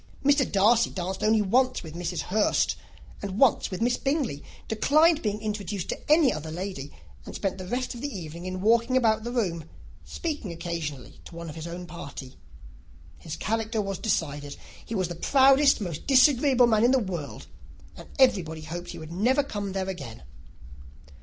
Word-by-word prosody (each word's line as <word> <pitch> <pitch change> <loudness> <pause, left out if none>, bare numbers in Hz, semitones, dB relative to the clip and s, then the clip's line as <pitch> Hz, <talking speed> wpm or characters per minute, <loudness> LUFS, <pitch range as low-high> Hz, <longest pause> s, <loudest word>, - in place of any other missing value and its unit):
Mr. 285 -2 +3
Darcy 225 +4 +4
danced 185 +1 -4
only 215 0 +3
once 255 +5 +2
with 160 -2 -9
Mrs. 175 -1 -3
Hurst 210 +2 +1 0.5
and 195 -1 -5
once 265 -1 +3
with 190 +4 -3
Miss 245 +1 +2
Bingley, 270 - -1 0.2
declined 310 +8 +3
being 210 -1 -2
introduced 210 -3 -4
to - - -4
any 305 -7 +5
other 155 +1 -6
lady, 170 -4 -5 0.3
and - - -9
spent 195 -1 -2
the 185 - -7
rest 250 +5 -2
of 240 - -9
the 285 - -2
evening 170 - -7
in 185 0 -4
walking 235 +4 +3
about 220 -3 +2
the 240 - -4
room, 175 -10 -2 0.3
speaking 300 - -4
occasionally 165 -6 -6
to 170 - -12
one 170 -1 -7
of - - -12
his 160 0 -6
own 175 +1 -6
party. 140 -6 -9 0.8
His 160 - -6
character 225 +1 -2
was 195 -3 -3
decided. 145 -8 -2 0.3
He 225 - -6
was 185 -3 0
the 175 - -5
proudest, 275 - +4
most 175 -7 -5
disagreeable 260 -1 +5
man 220 -2 +3
in 240 - +5
the 265 - +4
world, 180 - -5 0.5
and - - -12
everybody 180 -12 +2
hoped 170 +3 -6
that - - -8
he - - -8
would 160 0 -9
never 245 +11 +2
come 205 -7 -5
there 190 -1 -2
again. 140 - -7
200 Hz, 180 wpm, -26 LUFS, 170-245 Hz, 0.8 s, any